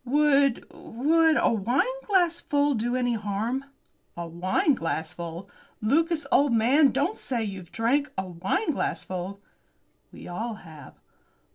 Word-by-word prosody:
"Would 280 Hz, 0 st, +3 dB
would 320 Hz, +6 st, +2 dB
a -, -, +3 dB
wineglassful 335 Hz, -, +1 dB
do 240 Hz, +1 st, -1 dB
any 245 Hz, -1 st, +1 dB
harm?" 220 Hz, +5 st, -2 dB, 0.5 s
"A 170 Hz, 0 st, -4 dB
wineglassful! 170 Hz, -, -1 dB, 0.3 s
Lucas, 310 Hz, +7 st, +1 dB
old 280 Hz, -3 st, +4 dB
man, 265 Hz, +6 st, +4 dB
don't 290 Hz, +10 st, -1 dB
say 240 Hz, -3 st, -2 dB
you've 190 Hz, -5 st, -7 dB
drank 270 Hz, +6 st, +1 dB
a 190 Hz, -, 0 dB
wineglassful!" 190 Hz, -, -2 dB, 0.7 s
"We -, -, -11 dB
all 220 Hz, +6 st, -4 dB
have." 160 Hz, -7 st, -13 dB
240 Hz, 110 wpm, -26 LUFS, 195-290 Hz, 0.7 s, old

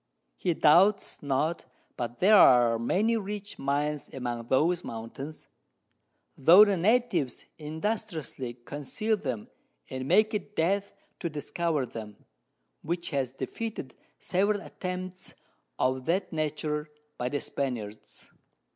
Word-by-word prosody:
He 175 Hz, -3 st, 0 dB
doubts 190 Hz, +8 st, +4 dB
not 145 Hz, +4 st, 0 dB, 0.3 s
but 120 Hz, 0 st, -4 dB
there 205 Hz, +4 st, +7 dB
are 120 Hz, -, +7 dB
many 210 Hz, -, +2 dB
rich 205 Hz, -1 st, -6 dB
Mines 145 Hz, +2 st, -1 dB
among 120 Hz, -3 st, -4 dB
those 165 Hz, +7 st, +2 dB
Mountains, 135 Hz, +7 st, -7 dB, 0.9 s
tho' 175 Hz, +9 st, +8 dB
the 200 Hz, -2 st, +2 dB
Natives 185 Hz, -, +1 dB
industriously 155 Hz, -, -3 dB
conceal 150 Hz, +10 st, -1 dB
them, 130 Hz, -, -4 dB, 0.4 s
and 130 Hz, 0 st, -4 dB
make 215 Hz, +8 st, +4 dB
it 210 Hz, 0 st, -4 dB
Death 195 Hz, +4 st, 0 dB, 0.2 s
to 170 Hz, -, -2 dB
discover 155 Hz, -1 st, -1 dB
them, 110 Hz, -3 st, -9 dB, 0.6 s
which 170 Hz, +2 st, -3 dB
has 135 Hz, -4 st, -1 dB
defeated 135 Hz, -, -5 dB, 0.2 s
several 200 Hz, +2 st, +1 dB
Attempts 185 Hz, 0 st, -6 dB, 0.4 s
of 130 Hz, 0 st, 0 dB
that 180 Hz, +2 st, 0 dB
Nature 150 Hz, 0 st, -2 dB, 0.3 s
by 125 Hz, -, -1 dB
the 145 Hz, -, -1 dB
Spaniards. 115 Hz, -8 st, -5 dB
155 Hz, 115 wpm, -28 LUFS, 130-190 Hz, 0.9 s, tho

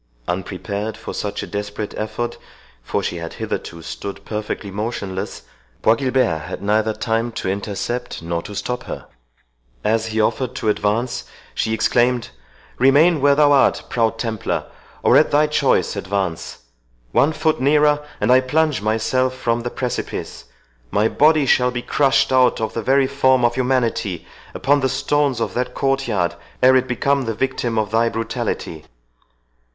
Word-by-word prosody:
Unprepared 100 Hz, +4 st, -3 dB
for -, -, -7 dB
such -, -, -3 dB
a -, -, -4 dB
desperate 105 Hz, 0 st, -5 dB
effort, 110 Hz, +2 st, -4 dB, 0.4 s
for -, -, -2 dB
she 85 Hz, -, -2 dB
had 85 Hz, -1 st, -6 dB
hitherto 85 Hz, -1 st, -5 dB
stood 100 Hz, +4 st, -7 dB
perfectly 105 Hz, -1 st, -4 dB
motionless, 100 Hz, -2 st, -4 dB, 0.4 s
Bois 110 Hz, -, +6 dB
Guilbert 130 Hz, -, +1 dB
had 90 Hz, +5 st, -7 dB
neither 110 Hz, +2 st, +2 dB
time 115 Hz, +1 st, -1 dB
to -, -, -4 dB
intercept 100 Hz, +2 st, -3 dB
nor 85 Hz, 0 st, -2 dB
to 100 Hz, +4 st, -9 dB
stop 125 Hz, +5 st, -3 dB
her. -, -, -6 dB, 0.8 s
As 110 Hz, +1 st, +1 dB
he 110 Hz, 0 st, -2 dB
offered 125 Hz, +3 st, 0 dB
to 110 Hz, -, -1 dB
advance, 110 Hz, +4 st, 0 dB, 0.3 s
she 110 Hz, -, -1 dB
exclaimed, 120 Hz, -, +2 dB, 0.5 s
"Remain 145 Hz, +5 st, +5 dB
where 140 Hz, 0 st, +5 dB
thou 145 Hz, 0 st, +5 dB
art, 140 Hz, -, +4 dB
proud 115 Hz, -3 st, +1 dB
Templar, 110 Hz, -2 st, -2 dB, 0.4 s
or -, -, +5 dB
at -, -, +4 dB
thy 150 Hz, +1 st, +4 dB
choice 150 Hz, -6 st, +1 dB
advance!—one 70 Hz, -, -2 dB
foot 155 Hz, -5 st, 0 dB
nearer, 150 Hz, +1 st, +3 dB, 0.2 s
and 105 Hz, +4 st, +2 dB
I 130 Hz, +1 st, +6 dB
plunge 150 Hz, 0 st, +1 dB
myself 120 Hz, +4 st, 0 dB
from 120 Hz, -2 st, -1 dB
the 120 Hz, -, -3 dB
precipice; 125 Hz, -, -4 dB, 0.4 s
my 105 Hz, -, +2 dB
body 155 Hz, -1 st, +4 dB
shall 125 Hz, -1 st, +4 dB
be 120 Hz, -1 st, -4 dB
crushed 135 Hz, -1 st, +2 dB
out 130 Hz, -1 st, +4 dB
of 110 Hz, -, -2 dB
the 115 Hz, -, -2 dB
very 135 Hz, +4 st, +3 dB
form 130 Hz, -2 st, +3 dB
of 120 Hz, -, +2 dB
humanity 120 Hz, -8 st, 0 dB, 0.3 s
upon 145 Hz, +3 st, +2 dB
the 130 Hz, -1 st, +1 dB
stones 140 Hz, -1 st, +1 dB
of 115 Hz, -, -2 dB
that 125 Hz, +1 st, -2 dB
court 135 Hz, -1 st, 0 dB
yard, 90 Hz, -6 st, 0 dB, 0.3 s
ere 130 Hz, +1 st, +7 dB
it 130 Hz, 0 st, +3 dB
become 140 Hz, +2 st, +1 dB
the 115 Hz, -1 st, -2 dB
victim 125 Hz, -2 st, -1 dB
of 110 Hz, -1 st, 0 dB
thy 115 Hz, +1 st, +3 dB
brutality!" 100 Hz, -8 st, -4 dB
120 Hz, 155 wpm, -20 LUFS, 105-130 Hz, 0.8 s, ere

